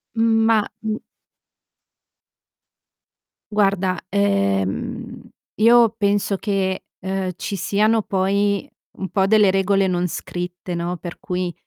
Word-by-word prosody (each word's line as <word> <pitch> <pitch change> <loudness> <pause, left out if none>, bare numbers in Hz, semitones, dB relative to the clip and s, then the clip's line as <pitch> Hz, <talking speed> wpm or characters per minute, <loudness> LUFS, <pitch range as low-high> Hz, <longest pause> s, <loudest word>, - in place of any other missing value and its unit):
Ma 225 -1 +3 0.2
m 220 0 -2 2.5
Guarda, 195 -3 +1
ehm, 100 - -1 0.3
io 230 +1 +6
penso 200 -1 +1
che, 190 -2 -1 0.2
ehm, 190 0 -2
ci 200 - -4
siano 215 +4 +2
poi 200 +1 0 0.3
un 190 - -4
po' 195 -1 +1
delle 210 -2 +5
regole 195 0 +2
non 180 0 0
scritte, 175 +2 -5
no, 170 +1 -2
per 175 -1 -8
cui, 180 -1 -3
195 Hz, 105 wpm, -21 LUFS, 180-205 Hz, 2.5 s, io